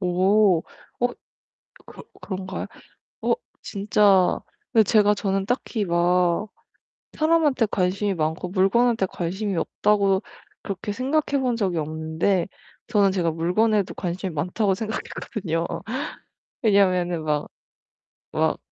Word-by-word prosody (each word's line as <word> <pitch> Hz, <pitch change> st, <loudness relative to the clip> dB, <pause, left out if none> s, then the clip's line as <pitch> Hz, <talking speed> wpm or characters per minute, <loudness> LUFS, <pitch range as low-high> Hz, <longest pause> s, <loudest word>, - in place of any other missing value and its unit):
오. 185 Hz, +1 st, +3 dB, 0.4 s
어. 245 Hz, -, +4 dB, 0.8 s
그 -, -, -12 dB, 0.2 s
그런가요? 190 Hz, -1 st, -5 dB, 0.5 s
어. -, -, +2 dB, 0.3 s
진짜 200 Hz, -2 st, +3 dB, 0.3 s
근데 225 Hz, -3 st, +6 dB
제가 210 Hz, 0 st, +4 dB
저는 195 Hz, -1 st, -1 dB
딱히 240 Hz, -2 st, -1 dB
막 175 Hz, +2 st, +2 dB, 0.7 s
사람한테 310 Hz, -6 st, +2 dB
관심이 195 Hz, +1 st, 0 dB
많고 160 Hz, +2 st, -2 dB
물건한테 195 Hz, +3 st, +2 dB
관심이 190 Hz, +3 st, -3 dB
없다고 200 Hz, +1 st, +2 dB, 0.4 s
그렇게 200 Hz, +2 st, -4 dB
생각해 280 Hz, +4 st, 0 dB
본 250 Hz, -2 st, +1 dB
적이 185 Hz, -6 st, 0 dB
없는데 160 Hz, +4 st, -1 dB, 0.4 s
저는 200 Hz, -4 st, +3 dB
제가 175 Hz, -3 st, +1 dB
물건에도 190 Hz, +5 st, +1 dB
관심이 180 Hz, +1 st, -4 dB
많다고 190 Hz, +6 st, 0 dB
생각했거든요. 190 Hz, -4 st, -3 dB, 1.0 s
왜냐하면은 185 Hz, -6 st, +2 dB
막 150 Hz, -1 st, -1 dB, 0.9 s
막 -, -, +2 dB
195 Hz, 245 characters per minute, -24 LUFS, 175-215 Hz, 1.0 s, 근데